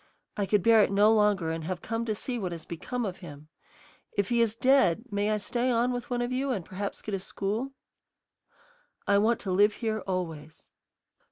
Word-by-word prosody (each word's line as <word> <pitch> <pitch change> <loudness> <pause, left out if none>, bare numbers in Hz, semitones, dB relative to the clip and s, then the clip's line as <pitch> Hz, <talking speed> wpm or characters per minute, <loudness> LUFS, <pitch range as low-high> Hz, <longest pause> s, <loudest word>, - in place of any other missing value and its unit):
I 200 -2 -1
could 205 -3 +2
bear 225 0 +6
it 200 - +2
no 205 +2 +5
longer 205 -6 +2
and 165 0 -4
have 180 0 -4
come 230 0 -2
to 215 -2 -1
see 245 +3 -4
what 180 -4 -3
has 165 -1 -8
become 240 +8 -4
of 190 -2 -4
him. 155 -4 -11 0.7
If 200 -1 +1
he 235 -1 +2
is 225 -2 +1
dead, 255 -6 +3
may 205 +1 0
I 215 - +1
stay 240 +4 -1
on 240 +1 +2
with 245 -1 -4
one 245 -1 0
of 240 - -3
you 265 +2 -1
and 200 -10 -2
perhaps 200 +2 -5
get 215 - -5
a 195 - 0
school? 210 +8 -3 1.3
I 200 0 +4
want 225 +3 +2
to 190 - -3
live 205 +3 +4
here 220 -2 -2
always." 160 -4 -5
210 Hz, 205 wpm, -28 LUFS, 185-235 Hz, 1.3 s, bear